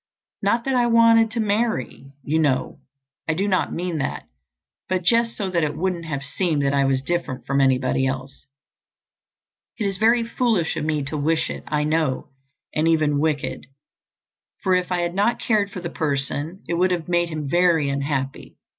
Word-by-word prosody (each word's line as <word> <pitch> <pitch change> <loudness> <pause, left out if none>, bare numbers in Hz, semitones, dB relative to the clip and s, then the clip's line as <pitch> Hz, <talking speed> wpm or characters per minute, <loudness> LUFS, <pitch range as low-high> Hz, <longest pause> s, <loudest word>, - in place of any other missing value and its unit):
Not 230 +4 +1
that 270 - 0
I 245 -1 +3
wanted 230 -1 +5
to 235 +1 -4
marry, 210 - -1
you 155 +4 0
know, 145 -5 0 0.5
I 155 - +1
do 195 +4 0
not 185 -2 +1
mean 175 -2 -3
that, 135 - -3 0.7
but 185 -1 0
just 230 +4 +2
so 195 -3 -2
that 170 -3 +1
it 150 0 -2
wouldn't 175 -1 -2
have 140 -3 -4
seemed 155 -1 -1
that 140 0 +1
I 140 -1 +3
was 135 -1 +1
different 170 -5 -3
from 140 0 +1
anybody 130 0 +2
else. 130 +1 -6 1.3
It 220 - -2
is 195 -2 -2
very 230 +2 +4
foolish 230 -7 0
of 155 - -2
me 155 -2 0
to 145 +3 -4
wish 160 +3 +1
it, - - -7
I 150 0 0
know, 155 -3 0 0.4
and 155 +1 +1
even 155 -3 +2
wicked—for 150 +5 -5
if 180 0 +1
I 180 -1 +1
had 175 0 -1
not 205 +5 +1
cared 210 -3 +1
for 185 - -7
the 170 - -4
person 145 +4 -2
it 170 0 -1
would 185 +1 +4
have 175 -3 -2
made 175 -1 +1
him 155 -3 -4
very 170 -1 +3
unhappy. 140 -1 -3
165 Hz, 180 wpm, -23 LUFS, 145-195 Hz, 1.3 s, wanted